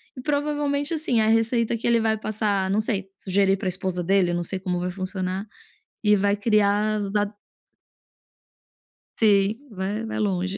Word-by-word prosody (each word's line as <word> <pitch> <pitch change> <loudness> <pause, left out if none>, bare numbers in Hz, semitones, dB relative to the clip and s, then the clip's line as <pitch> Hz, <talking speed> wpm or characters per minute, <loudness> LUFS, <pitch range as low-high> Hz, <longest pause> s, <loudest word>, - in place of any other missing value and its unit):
e 255 - -7
provavelmente, 290 +1 -1
assim, 295 -7 +1
a 215 - +3
receita 225 +1 +2
que 225 - -6
ele 235 -1 +4
vai 220 -1 +1
passar 205 -3 -1
não 205 +2 +2
sei, 195 -3 -2
sugerir 195 0 +2
para 190 - -4
esposa 185 -1 -1
dele, 185 -1 +2
não 175 0 -1
sei 190 +2 -4
como 180 -2 -2
vai 180 +1 -2
funcionar, 185 +1 -4 0.6
e 210 0 +5
vai 200 +1 +2
criar 210 0 +2
as 200 -1 -3
da 205 0 +1 1.9
Sim, 215 +5 +2
vai 205 +3 -3
vai 220 - -4
longe. 190 -1 -1
205 Hz, 165 wpm, -24 LUFS, 190-225 Hz, 1.9 s, e